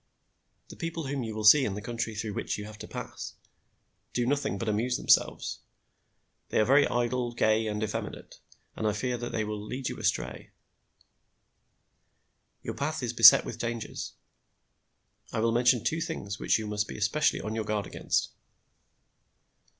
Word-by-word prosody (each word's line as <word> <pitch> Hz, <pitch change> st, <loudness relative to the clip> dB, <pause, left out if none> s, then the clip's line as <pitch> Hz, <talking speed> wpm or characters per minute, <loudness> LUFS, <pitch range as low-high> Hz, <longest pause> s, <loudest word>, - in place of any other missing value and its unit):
The -, -, -10 dB
people 165 Hz, -1 st, -4 dB
whom 135 Hz, 0 st, -2 dB
you 110 Hz, -2 st, -5 dB
will 110 Hz, -, -3 dB
see 135 Hz, +7 st, +8 dB
in 100 Hz, -6 st, -1 dB
the -, -, -4 dB
country 115 Hz, -1 st, -3 dB
through 105 Hz, -1 st, -4 dB
which -, -, -3 dB
you 105 Hz, -, -6 dB
have 105 Hz, 0 st, -11 dB
to -, -, -8 dB
pass, -, -, -7 dB, 0.8 s
do 120 Hz, -, 0 dB
nothing 140 Hz, -6 st, 0 dB
but 115 Hz, -, -4 dB
amuse 115 Hz, +4 st, 0 dB
themselves. -, -, +2 dB, 0.9 s
They -, -, +1 dB
are 110 Hz, -, +4 dB
very 140 Hz, +4 st, +5 dB
idle, 120 Hz, 0 st, -1 dB
gay 110 Hz, -1 st, +2 dB
and 105 Hz, 0 st, -2 dB
effeminate, 110 Hz, -, -5 dB, 0.4 s
and 110 Hz, -, -1 dB
I 105 Hz, -, +1 dB
fear 120 Hz, +3 st, -2 dB
that 120 Hz, -, -4 dB
they 110 Hz, -, -1 dB
will 105 Hz, -1 st, -4 dB
lead 125 Hz, +4 st, -4 dB
you -, -, -6 dB
astray. -, -, -2 dB, 2.1 s
Your -, -, -4 dB
path 150 Hz, 0 st, -3 dB
is 120 Hz, -1 st, -2 dB
beset 115 Hz, -1 st, +9 dB
with 120 Hz, -, -6 dB
dangers. 115 Hz, -1 st, -4 dB, 1.2 s
I 115 Hz, -, -2 dB
will 115 Hz, +1 st, +2 dB
mention 120 Hz, 0 st, +3 dB
two 165 Hz, +1 st, 0 dB
things 105 Hz, -, -4 dB
which -, -, +2 dB
you 110 Hz, -, -5 dB
must 105 Hz, 0 st, -1 dB
be -, -, -7 dB
especially 110 Hz, +9 st, +1 dB
on 110 Hz, -, -4 dB
your 110 Hz, 0 st, -2 dB
guard 105 Hz, -1 st, -2 dB
against. -, -, -1 dB
115 Hz, 170 wpm, -29 LUFS, 105-125 Hz, 2.1 s, beset